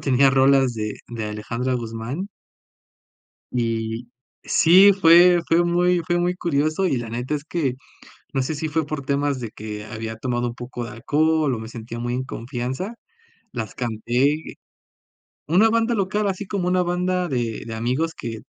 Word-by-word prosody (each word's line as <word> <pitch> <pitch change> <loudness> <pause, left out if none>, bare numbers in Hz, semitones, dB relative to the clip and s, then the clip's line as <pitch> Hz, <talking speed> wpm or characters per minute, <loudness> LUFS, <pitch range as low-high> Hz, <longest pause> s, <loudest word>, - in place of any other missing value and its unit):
tenía 135 -2 +4
rolas 135 -1 +4
de 105 -1 -3
de 115 -2 -4
Alejandra 115 +4 -3
Guzmán. 120 - -4 1.2
Y, 115 -1 -2 0.3
sí 190 +5 +6
fue 175 -1 +6
fue 170 +1 +4
muy 175 +1 +2
fue 175 0 +1
muy 175 +1 +1
curioso 155 +1 0
y 135 - +1
la 120 -1 -5
neta 120 +5 -3
es 145 -1 -4
que, 155 -6 -1 0.6
no 135 -2 +1
sé, 135 +5 -2
si 155 +2 -3
fue 155 0 -1
por 145 -2 -4
temas 140 0 0
de 115 -3 -5
que 105 -1 -7
había 110 0 -6
tomado 120 +1 -1
un 120 - -6
poco 120 0 -6
de 115 - -7
alcohol 150 +5 +1
o - - -4
me 110 0 -7
sentía 115 0 -7
muy 120 +1 -2
en 130 +1 -2
confianza, 130 - -4 0.6
las 110 -4 -5
canté 125 +6 -1 0.9
una 185 +8 +5
banda 230 +1 +2
local, 205 +1 0
así 195 +1 -3
como 190 -3 -2
una 180 0 +2
banda 180 0 0
de 120 -5 -2
de 115 - -6
amigos 130 +9 -1
que 115 -2 -6
135 Hz, 170 wpm, -23 LUFS, 115-175 Hz, 1.2 s, sí